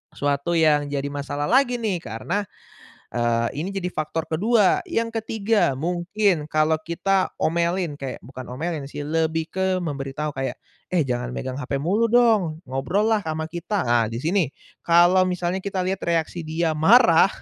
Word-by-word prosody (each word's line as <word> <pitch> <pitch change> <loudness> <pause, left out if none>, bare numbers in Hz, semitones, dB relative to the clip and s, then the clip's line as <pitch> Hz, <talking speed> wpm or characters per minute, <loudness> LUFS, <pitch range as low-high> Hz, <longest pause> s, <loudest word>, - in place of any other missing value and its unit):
suatu 145 +4 0
yang 150 -3 +3
jadi 140 0 -3
masalah 145 0 -4
lagi 250 - +3
nih 215 -7 -1
karena, 165 - -3 0.7
eee, 120 -1 +1 0.2
ini 190 - -4
jadi 195 -2 -3
faktor 160 -1 -3
kedua 205 +5 +2
yang 230 0 -1
ketiga 225 -4 0
mungkin 175 +4 0
kalau 155 +1 +3
kita 190 +3 0
omelin 170 -1 0
kayak 135 -3 -6
bukan 130 0 -10
omelin 155 +3 -3
sih 145 +1 -6
lebih 160 0 0
ke 190 0 0
memberi 140 -5 -4
tahu 150 +1 -4
kayak, 130 -2 -3 0.3
"Eh, 170 -6 +1
jangan 125 0 -2
megang 130 +1 -4
hape 135 0 -3
mulu 210 +9 +1
dong 220 -10 +3
ngobrollah 200 - 0
ama 160 -1 -3
kita," 175 - -3
ah, 120 -1 +4
disini 155 - 0 0.3
kalau 175 +2 +5
misalnya 180 0 -2
kita 195 -1 -3
lihat 185 +1 -2
reaksi 170 0 -1
dia 160 0 -1
marah 190 +2 +6
165 Hz, 155 wpm, -23 LUFS, 145-190 Hz, 0.7 s, marah